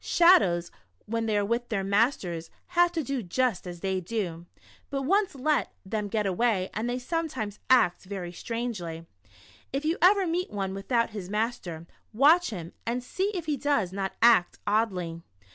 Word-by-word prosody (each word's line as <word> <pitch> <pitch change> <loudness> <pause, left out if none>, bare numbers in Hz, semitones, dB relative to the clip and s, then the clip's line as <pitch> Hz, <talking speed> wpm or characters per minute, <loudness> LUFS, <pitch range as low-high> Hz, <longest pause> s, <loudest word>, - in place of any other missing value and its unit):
Shadows 195 - +4 0.3
when 225 +1 -2
they 215 -1 +1
are 205 - +1
with 235 +3 -1
their 200 -4 -1
masters 195 -5 0 0.2
have 350 -1 +4
to 325 -2 -1
do 270 -1 -2
just 220 0 -1
as 175 -1 -8
they 190 -1 0
do, 175 -4 -4 0.4
but 275 -1 -2
once 390 +3 +2
let 295 +3 0
them 210 +1 -2
get 210 0 -1
away 195 0 +1
and 225 +3 -2
they 245 - -1
sometimes 255 - -3
act 220 -9 +4
ver} 185 -3 -5
strangely. 180 -6 -4 0.7
If 275 +3 -2
you 325 +3 0
ever 390 +2 +5
meet 350 +2 -1
one 195 -2 -3
without 230 +4 0
his 200 -4 -6
master, 210 -7 -3 0.3
watch 310 +9 +5
him 170 -6 -7
and 240 +2 -2
see 380 +10 -1
if 345 -3 -3
he 300 -2 -1
does 255 -10 0
not 195 -1 -2
act 230 -7 +5
oddly. 185 -6 0
220 Hz, 170 wpm, -27 LUFS, 190-275 Hz, 0.7 s, ever